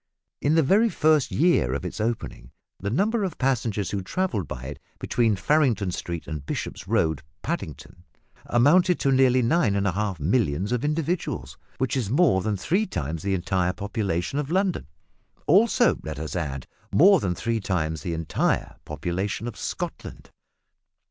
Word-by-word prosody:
In 150 +3 +2
the 165 - +4
very 210 +10 +4
first 155 - +2
year 130 - +2
of 70 - -4
its - - -4
opening 110 - -3 0.3
the 100 - -3
number 205 - +1
of 185 - -3
passengers 115 -7 0
who 100 - -2
travelled 105 - -2
by 60 - -7
it 70 +2 -7 0.2
between 115 -3 +1
Farringdon 110 - +2
Street 85 -2 -5
and 75 -3 -6
Bishop's - - -5
Road, 80 -3 +1 0.2
Paddington, 70 +2 -5 0.4
amounted 170 +9 +4
to 135 - +2
nearly 130 -1 +4
nine 115 -5 +2
and 100 0 0
a 100 - +2
half 100 -2 -2
millions 95 - 0
of 125 +1 0
individuals, 160 +3 -2 0.2
which 130 0 -1
is 120 -7 -1
more 130 - +3
than 105 +1 -1
three 190 - 0
times 80 - -4
the 100 +1 0
entire 90 0 0
population 100 - -2
of 150 -1 -3
London 185 - 0 0.6
also, 225 - +4
let 80 -1 -6
us 80 +3 -5
add, 70 -6 -3 0.3
more 195 +3 +6
than 90 -7 -1
three 115 +4 -1
times 80 -6 -2
the 85 - -3
entire 80 -1 -1
population 95 +8 -3
of 120 - -6
Scotland! - - -6
105 Hz, 160 wpm, -25 LUFS, -, 0.6 s, more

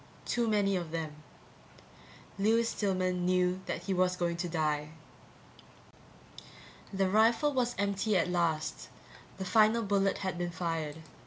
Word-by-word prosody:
Too 240 -1 0
many 205 -2 +2
of 175 -3 -3
them. 160 -2 -4 1.3
Lewis 225 +3 +3
Stillman 185 -4 -1
knew 180 0 +2
that - - -3
he 195 - -1
was 180 0 +2
going 175 -1 -1
to 175 0 -3
die. 155 -2 -1 2.0
The 195 -1 +1
rifle 230 +9 +3
was 245 -2 0
empty 200 +1 +1
at 170 - +1
last, 170 -3 -1 0.5
the 190 - -4
final 220 +4 +4
bullet 195 -1 +1
had 190 -2 -3
been 175 0 -1
fired. 165 -3 -4
185 Hz, 135 wpm, -31 LUFS, 170-205 Hz, 2.0 s, final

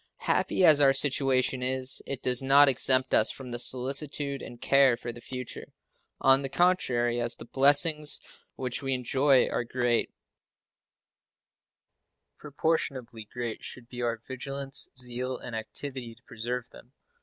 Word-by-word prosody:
Happy 185 - +2
as 155 -3 +6
our 135 -1 +5
situation 135 -2 +1
is, 130 0 -1
it 135 -2 -5
does 125 0 +3
not 140 +2 +6
exempt 130 0 +2
us 110 - +4
from 125 -3 -7
solicitude 140 +3 -2
and 120 - -10
care 135 -3 +4
for 120 - -6
the 120 - -13
future. 125 0 -8 0.5
On 135 +1 +4
the 135 - -4
contrary, 120 -9 +1
as 120 0 -2
the - - -12
blessings 145 +4 +3 0.4
which 125 -2 -4
we 135 -1 -1
enjoy 130 +2 +2
are - - -2
great, 120 -1 -1 2.3
proportionably 135 -6 -3
great 120 -2 -5
should 125 -2 -9
be 125 0 -8
our 120 -1 -1
vigilance, 135 +3 -2
zeal, 125 +1 -3
and 120 - -8
activity 120 +1 -5
to 125 - -27
preserve 120 +1 -6
them. 125 - -17
130 Hz, 140 wpm, -27 LUFS, 120-140 Hz, 2.3 s, as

